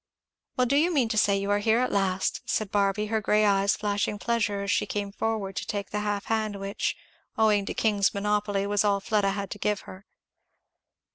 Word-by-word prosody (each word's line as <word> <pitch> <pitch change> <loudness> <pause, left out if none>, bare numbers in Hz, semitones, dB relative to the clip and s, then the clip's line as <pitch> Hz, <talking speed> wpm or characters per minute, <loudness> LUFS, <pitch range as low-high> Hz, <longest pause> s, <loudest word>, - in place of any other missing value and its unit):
"Well 250 - +3
do 275 +3 +2
you 335 +4 +3
mean 265 -8 +2
to 220 - -1
say 200 -1 +3
you 200 +1 -2
are 205 - +3
here 220 +2 +2
at 255 +1 +1
last?" 190 -1 0
said 215 -3 -1
Barby, 200 +1 +1
her 220 - +1
grey 210 +1 +3
eyes 200 0 +3
flashing 205 0 -1
pleasure 210 -3 -1
as 200 - -1
she - - +1
came 205 -1 -3
forward 205 -2 -2
to - - -3
take 205 -1 -4
the 210 - -1
half 205 -1 -2
hand 215 -2 -1
which, 195 +1 -2 0.4
owing 210 -2 +3
to - - -4
King's 205 -3 +2
monopoly, 205 -1 0
was 205 +1 +1
all 200 -1 +2
Fleda 205 -1 +1
had 200 -1 -4
to 205 - -6
give 210 0 0
her. 190 +2 -12
205 Hz, 210 wpm, -27 LUFS, 200-215 Hz, 0.4 s, Well